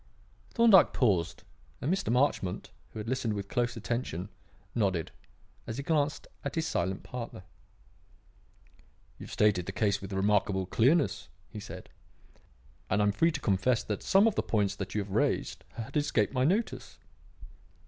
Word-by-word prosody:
Thorndyke 230 Hz, -6 st, +6 dB
paused, 95 Hz, -, +1 dB, 0.4 s
and 155 Hz, +7 st, 0 dB
Mr. 195 Hz, -10 st, -1 dB
Marchmont, 125 Hz, -8 st, 0 dB, 0.2 s
who -, -, -11 dB
had 105 Hz, +1 st, -5 dB
listened 125 Hz, -3 st, -1 dB
with 100 Hz, -1 st, -4 dB
close 120 Hz, +2 st, -1 dB
attention, 110 Hz, -5 st, -3 dB, 0.4 s
nodded, 95 Hz, -8 st, 0 dB, 0.6 s
as 115 Hz, -, -4 dB
he 140 Hz, -, -3 dB
glanced 145 Hz, -1 st, 0 dB, 0.2 s
at 140 Hz, -, -4 dB
his 160 Hz, -1 st, 0 dB
silent 95 Hz, -, -1 dB
partner. 120 Hz, -6 st, -7 dB, 1.8 s
"You -, -, -8 dB
have -, -, -12 dB
stated 100 Hz, -4 st, +2 dB
the -, -, -2 dB
case 100 Hz, 0 st, 0 dB
with 100 Hz, 0 st, -7 dB
remarkable 95 Hz, -1 st, +1 dB
clearness," 130 Hz, -, +2 dB, 0.2 s
he -, -, -6 dB
said; -, -, -9 dB, 1.0 s
"and 100 Hz, -, +2 dB
I 105 Hz, -, +3 dB
am 105 Hz, -, +3 dB
free 165 Hz, +12 st, +2 dB
to 150 Hz, -, -4 dB
confess 110 Hz, +4 st, +2 dB
that 105 Hz, -, -3 dB
some 195 Hz, +2 st, +4 dB
of 225 Hz, -, +3 dB
the -, -, 0 dB
points 100 Hz, -3 st, 0 dB
that -, -, -5 dB
you 105 Hz, -, +1 dB
have 100 Hz, -1 st, -7 dB
raised -, -, 0 dB
had 115 Hz, -1 st, -7 dB
escaped 140 Hz, -8 st, +1 dB
my 130 Hz, -1 st, +2 dB
notice." 205 Hz, +9 st, -1 dB
110 Hz, 160 wpm, -30 LUFS, 100-140 Hz, 1.8 s, Thorndyke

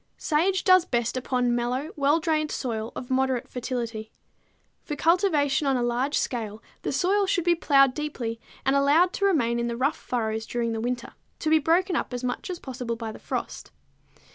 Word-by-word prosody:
_ -, -, -43 dB
Sage 360 Hz, +4 st, +1 dB
does 370 Hz, -2 st, +6 dB
best 240 Hz, -7 st, -1 dB
upon 250 Hz, -1 st, 0 dB
mellow 250 Hz, +5 st, -1 dB
well 290 Hz, +2 st, +3 dB
drained 310 Hz, -2 st, 0 dB
soil 230 Hz, -5 st, -3 dB
of 250 Hz, -, -7 dB
moderate 260 Hz, -1 st, +1 dB
fertility. 235 Hz, -4 st, -4 dB, 0.7 s
For 295 Hz, -, -4 dB
cultivation 305 Hz, -4 st, +2 dB
on 270 Hz, -1 st, +2 dB
a 245 Hz, -, 0 dB
large 245 Hz, +4 st, 0 dB
scale 220 Hz, -3 st, -3 dB, 0.2 s
the -, -, -2 dB
soil 385 Hz, +8 st, +2 dB
should 360 Hz, -2 st, +1 dB
be 345 Hz, 0 st, +4 dB
plowed 275 Hz, -5 st, +4 dB
deeply 255 Hz, -7 st, -4 dB, 0.3 s
and 270 Hz, -, +3 dB
allowed 295 Hz, +6 st, +4 dB
to 400 Hz, -, 0 dB
remain 235 Hz, -11 st, +2 dB
in 235 Hz, -, -1 dB
the 235 Hz, 0 st, -3 dB
rough 275 Hz, +5 st, +1 dB
furrows 220 Hz, -2 st, -3 dB
during 235 Hz, -1 st, -1 dB
the 225 Hz, -1 st, -3 dB
winter, 245 Hz, 0 st, -3 dB, 0.2 s
to 310 Hz, -, -1 dB
be 315 Hz, -, +6 dB
broken 345 Hz, +4 st, +2 dB
up 250 Hz, -, -2 dB
as 245 Hz, -, -5 dB
much 250 Hz, +8 st, -3 dB
as 360 Hz, -, -3 dB
possible 250 Hz, -5 st, -5 dB
by 225 Hz, -1 st, -5 dB
the -, -, -11 dB
frost. -, -, -5 dB
265 Hz, 190 wpm, -26 LUFS, 240-315 Hz, 0.7 s, does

